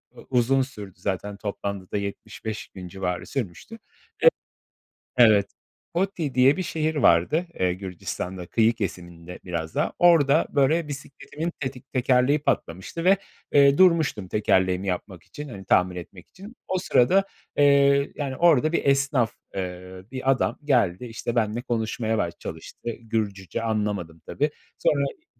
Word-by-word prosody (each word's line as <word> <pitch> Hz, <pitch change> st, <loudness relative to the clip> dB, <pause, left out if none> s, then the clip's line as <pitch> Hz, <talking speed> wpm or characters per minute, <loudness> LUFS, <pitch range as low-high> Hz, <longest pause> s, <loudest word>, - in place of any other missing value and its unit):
eee, -, -, -13 dB
uzun 130 Hz, +1 st, +3 dB
sürdü 105 Hz, -8 st, -7 dB
zaten. 100 Hz, +1 st, -3 dB
Toplamda 100 Hz, -2 st, -5 dB
da -, -, 0 dB
75 100 Hz, -1 st, -6 dB
civarı 90 Hz, -1 st, -3 dB
sürmüştü. 130 Hz, -, -5 dB, 1.4 s
E, 120 Hz, -, +8 dB
evet, 105 Hz, -3 st, +5 dB, 0.4 s
Gotti 170 Hz, -6 st, -1 dB
diye 130 Hz, +3 st, +5 dB
bir 185 Hz, -, -1 dB
şehir 160 Hz, -2 st, -1 dB
vardı. 145 Hz, -, +3 dB
Eee, 90 Hz, -1 st, +2 dB
Gürcistan'da 90 Hz, -1 st, -6 dB
kıyı 115 Hz, +3 st, +3 dB
kesiminde 90 Hz, -4 st, -6 dB
biraz 80 Hz, -3 st, -4 dB
daha. -, -, 0 dB
Orada 160 Hz, -3 st, +5 dB
böyle 150 Hz, +4 st, +2 dB
bisikletimin 145 Hz, +3 st, -6 dB
tetik 130 Hz, -3 st, -6 dB
tekerleği 130 Hz, +3 st, +3 dB
patlamıştı 95 Hz, -, -2 dB
ve 190 Hz, +2 st, +5 dB, 0.3 s
eee, 140 Hz, 0 st, +6 dB
durmuştum, 160 Hz, -, +3 dB
tekerleğimi 95 Hz, -2 st, +1 dB
yapmak 90 Hz, -1 st, -4 dB
için 150 Hz, -1 st, -9 dB
hani, 95 Hz, -4 st, -9 dB
tahmin 90 Hz, 0 st, +3 dB
etmek 90 Hz, 0 st, -10 dB
için. 205 Hz, +6 st, -13 dB
O 185 Hz, -, 0 dB
sırada, 180 Hz, +3 st, +3 dB, 0.3 s
eee, 140 Hz, -1 st, +4 dB
yani, 140 Hz, -3 st, -3 dB
orada 155 Hz, -3 st, +4 dB
bir 170 Hz, -, 0 dB
esnaf, 135 Hz, -4 st, +2 dB, 0.2 s
eee, 90 Hz, 0 st, -6 dB
bir 130 Hz, 0 st, +1 dB
adam 130 Hz, -, 0 dB
geldi 125 Hz, -7 st, +1 dB
işte, 115 Hz, +1 st, -4 dB
benimle 110 Hz, 0 st, 0 dB
konuşmaya 110 Hz, -2 st, -1 dB
baş 85 Hz, -4 st, -1 dB
çalıştı. -, -, -7 dB
Gürcüce 110 Hz, -3 st, -3 dB
anlamadım, 105 Hz, -7 st, -2 dB
tabii. 150 Hz, +2 st, 0 dB, 0.3 s
Sonra 140 Hz, -, +2 dB
Hı 140 Hz, -, -4 dB
115 Hz, 140 wpm, -25 LUFS, 95-140 Hz, 1.4 s, E